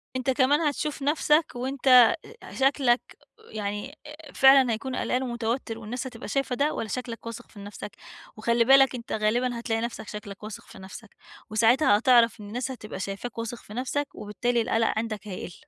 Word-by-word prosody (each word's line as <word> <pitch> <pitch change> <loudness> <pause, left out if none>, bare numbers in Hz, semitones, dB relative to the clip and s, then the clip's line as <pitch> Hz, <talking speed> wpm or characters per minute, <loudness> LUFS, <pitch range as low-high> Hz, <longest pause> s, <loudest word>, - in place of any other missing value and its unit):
أنتَ 255 0 -2
كمان 285 +4 +3
هتشوف 300 -1 -2
نفسَك 300 +2 +3
وأنتَ 265 +2 -4 0.6
أ - - -11
شكلك 265 -2 +3 0.5
يعني، 210 +7 -5
آآ، 300 -1 -12
فعلًا 265 -3 +6
هيكون 255 +4 -4
قلقان 255 +1 -1
ومتوتّر 235 -1 -3
والناس 235 +4 -5
هتبقى 245 -1 -8
شايفة 275 -3 -1
ده، 290 +2 +1
والّا 225 - -4
شكلك 235 0 -5
واثق 230 -1 -8
في 205 - -15
نفسَك؟ 205 0 -9 0.4
وخلّي 235 +2 +2
بالك 270 +1 +6
أنتَ 235 -2 -7
غالبًا 235 +3 0
هتلاقي 225 -1 -1
نفسك 235 -2 -5
شكلك 210 -1 -8
واثق 215 -1 -8
في - - -14
نفسَك، 190 +3 -12 0.3
وساعتها 225 +1 +4
هتعرف 235 -2 +4
إن 205 - -9
الناس 245 +4 -4
هتبقى 215 -6 -7
شايفاك 200 +5 -5
واثق 230 +1 -4
في 210 - -12
نفسَك 270 +3 -2
وبالتالي 230 +3 -1
القلق 225 0 +1
عندك 215 -2 -4
هيقل. 180 -2 -7
240 Hz, 170 wpm, -26 LUFS, 215-265 Hz, 0.6 s, فعلًا